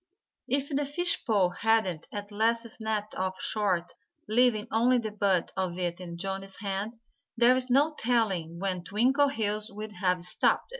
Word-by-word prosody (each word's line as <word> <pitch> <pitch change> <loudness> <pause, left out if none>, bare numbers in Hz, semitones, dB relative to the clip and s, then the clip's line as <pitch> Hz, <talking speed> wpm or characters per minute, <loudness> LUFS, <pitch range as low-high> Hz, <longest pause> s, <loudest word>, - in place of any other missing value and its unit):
If 275 +1 0
the 290 0 0
fish 350 +5 -1
pole 200 -6 +3
hadn't 190 -4 +1
at 205 0 -6
last 230 +2 +1
snapped 220 -2 -3
off 185 0 -3
short, 185 -5 0 0.3
leaving 230 0 +3
only 245 +3 +4
the 220 -3 -2
butt 195 -4 +1
of 185 -2 -2
it 175 -1 -2
in 170 -2 -7
Johnnie's 195 +1 -5
hand, 200 +3 -3 0.4
there's 250 +2 +4
no 285 +5 +4
telling 195 -9 0
when 185 -1 -2
Twinkleheels 220 - +1
would 210 +1 -7
have 180 -2 0
stopped. 180 - +1
210 Hz, 150 wpm, -29 LUFS, 190-235 Hz, 0.4 s, only